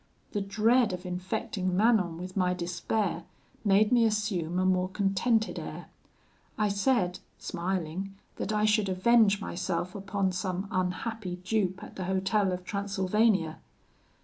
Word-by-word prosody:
The 205 Hz, -, -1 dB
dread 220 Hz, +3 st, +3 dB
of 180 Hz, +1 st, -6 dB
infecting 185 Hz, 0 st, -2 dB
Manon 200 Hz, -6 st, +3 dB
with 185 Hz, +2 st, -7 dB
my 180 Hz, -2 st, +2 dB
despair 180 Hz, +1 st, -2 dB, 0.4 s
made 210 Hz, +1 st, +4 dB
me 240 Hz, -2 st, +5 dB
assume 205 Hz, -6 st, 0 dB
a 185 Hz, -, +2 dB
more 185 Hz, 0 st, +2 dB
contented 210 Hz, +4 st, +1 dB
air. -, -, -7 dB, 0.7 s
I 210 Hz, -1 st, +2 dB
said, 200 Hz, -3 st, +1 dB, 0.2 s
smiling, 185 Hz, +1 st, -3 dB, 0.2 s
that 215 Hz, -, -3 dB
I 210 Hz, 0 st, +2 dB
should 215 Hz, -2 st, +2 dB
avenge 205 Hz, +2 st, +4 dB
myself 180 Hz, -1 st, -3 dB
upon 195 Hz, -1 st, -1 dB
some 185 Hz, +1 st, -3 dB
unhappy 185 Hz, +1 st, -2 dB
dupe 190 Hz, -2 st, 0 dB
at -, -, -11 dB
the 185 Hz, -, -3 dB
hotel 190 Hz, +1 st, +1 dB
of 180 Hz, 0 st, -4 dB
Transylvania. 195 Hz, -3 st, +1 dB
195 Hz, 135 wpm, -29 LUFS, 180-210 Hz, 0.7 s, me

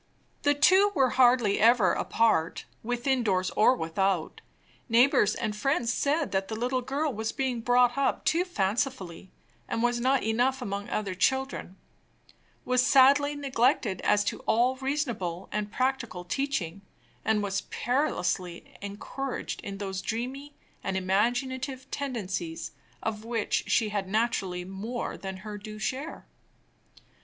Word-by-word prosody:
The 290 Hz, 0 st, +3 dB
two 375 Hz, +7 st, +5 dB
were 265 Hz, -4 st, +3 dB
hardly 245 Hz, -5 st, +4 dB
ever 225 Hz, -4 st, +5 dB
apart, 200 Hz, -8 st, +1 dB, 0.2 s
within 245 Hz, +3 st, 0 dB
doors 185 Hz, -4 st, 0 dB
or 250 Hz, +4 st, +4 dB
without. 180 Hz, -1 st, -1 dB, 0.5 s
Neighbors 230 Hz, -3 st, +4 dB
and 215 Hz, -2 st, -2 dB
friends 240 Hz, 0 st, 0 dB
said 295 Hz, +1 st, 0 dB
that 190 Hz, 0 st, 0 dB
the 220 Hz, -, -4 dB
little 250 Hz, +3 st, -1 dB
girl 275 Hz, +3 st, -1 dB
was 220 Hz, 0 st, -2 dB
being 255 Hz, -3 st, -2 dB
brought 245 Hz, +1 st, +4 dB
up 275 Hz, 0 st, 0 dB
too 340 Hz, +2 st, +3 dB
fancifully, 200 Hz, -, -2 dB, 0.4 s
and 230 Hz, -, -2 dB
was 240 Hz, 0 st, +2 dB
not 260 Hz, +2 st, +2 dB
enough 245 Hz, +4 st, +1 dB
among 200 Hz, -4 st, -4 dB
other 200 Hz, -3 st, -2 dB
children, 265 Hz, -1 st, -1 dB, 0.9 s
was 255 Hz, 0 st, +3 dB
sadly 280 Hz, +2 st, +5 dB
neglected 255 Hz, -7 st, +1 dB
as 205 Hz, 0 st, +3 dB
to -, -, -2 dB
all 240 Hz, +4 st, +3 dB
reasonable 240 Hz, -, -2 dB
and 210 Hz, 0 st, -3 dB
practical 245 Hz, -8 st, -2 dB
teaching, 200 Hz, -5 st, -2 dB, 0.4 s
and 215 Hz, -1 st, +1 dB
was 200 Hz, 0 st, -1 dB
perilously 185 Hz, -, -1 dB
encouraged 210 Hz, +7 st, -5 dB
in 200 Hz, 0 st, -6 dB
those 190 Hz, -2 st, -4 dB
dreamy 265 Hz, +7 st, -4 dB, 0.3 s
and 195 Hz, -1 st, -1 dB
imaginative 250 Hz, +7 st, -1 dB
tendencies 190 Hz, -12 st, -4 dB, 0.3 s
of 215 Hz, -1 st, -3 dB
which 230 Hz, -2 st, -1 dB
she 220 Hz, -3 st, +2 dB
had 200 Hz, -2 st, -3 dB
naturally 195 Hz, -5 st, -1 dB
more 210 Hz, +6 st, -4 dB
than 190 Hz, -1 st, -6 dB
her 210 Hz, -1 st, -6 dB
due 215 Hz, +1 st, -8 dB
share. 265 Hz, +9 st, -4 dB
230 Hz, 135 wpm, -28 LUFS, 200-265 Hz, 0.9 s, two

